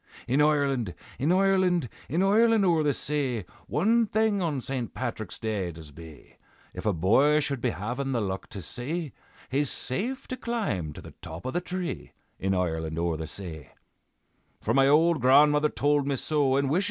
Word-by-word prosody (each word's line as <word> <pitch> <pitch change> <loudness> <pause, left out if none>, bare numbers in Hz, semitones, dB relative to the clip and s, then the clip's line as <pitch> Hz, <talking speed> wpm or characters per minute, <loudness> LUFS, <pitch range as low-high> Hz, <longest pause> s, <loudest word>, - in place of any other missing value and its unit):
In 135 +4 +2
Ireland, 140 - +1 0.2
in 145 +6 +2
Ireland, 185 -5 +3 0.2
In 165 +7 +1
Ireland 220 +1 +4
o'er 170 -3 +3
the 150 -1 +2
say, 135 -7 -2 0.2
One 225 +8 +2
thing 215 -1 +1
on 155 -6 -1
St. 125 -2 -4
Patrick's 115 -5 -4
Day 105 -5 -2
does 80 -2 -12
be, 80 -1 -14 0.4
If - - -5
a - - +4
boy 115 - +4
should 140 -4 -2
be - - +1
havin' 120 - -3
the 125 - 0
luck 95 -3 -4
to 95 - -7
see, 145 - -4 0.4
He's 140 +1 +1
safe 235 - -2
to 255 - -4
climb 205 - -2
to - - -10
the - - -11
top 80 +1 -8
of 130 - -3
the 175 - 0
tree, 180 -1 -5 0.3
In 95 0 0
Ireland 80 -3 -2
o'er 85 -1 0
the 80 0 -5
say. 80 -6 -8 0.9
"For - - -1
my 135 0 +5
ould 160 +1 +4
grandmother 150 +4 +5
told 145 -1 +1
me 140 - +1
so, 140 -1 +1
And 140 0 +1
wisha! 170 - +3
140 Hz, 180 wpm, -27 LUFS, 100-170 Hz, 0.9 s, my